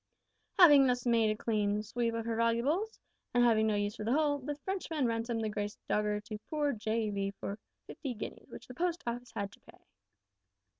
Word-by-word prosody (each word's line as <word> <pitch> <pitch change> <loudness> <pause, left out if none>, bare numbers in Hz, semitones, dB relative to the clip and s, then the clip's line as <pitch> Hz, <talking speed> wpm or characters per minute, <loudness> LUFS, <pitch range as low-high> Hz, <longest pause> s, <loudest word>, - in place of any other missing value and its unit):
Having 290 -7 +8
thus 245 -1 0
made 230 -2 +3
a 215 - 0
clean 210 -2 0
sweep 230 +1 -1
of 230 -1 -3
her 230 -1 -1
valuables, 250 - +1 0.4
and 245 - +5
having 220 -2 +4
no 215 - +2
use 205 0 -1
for - - -5
the 230 +3 +1
hull, 290 -1 +2
the 290 +2 -4
Frenchman 325 -3 -2
ransomed 230 0 -1
the 215 - 0
`Grace 205 0 -3
Dogger' 210 0 0
to 215 0 -7
poor 295 -2 +1
J.V. 210 -3 -1
for 200 +2 -5 0.3
fifty 265 -6 -6
guineas, 215 - -8
which 240 - -10
the 250 - -10
Post 345 +3 -1
Office 240 0 -4
had 200 -2 -3
to - - -17
pay! - - -18
230 Hz, 195 wpm, -32 LUFS, 215-275 Hz, 0.4 s, Having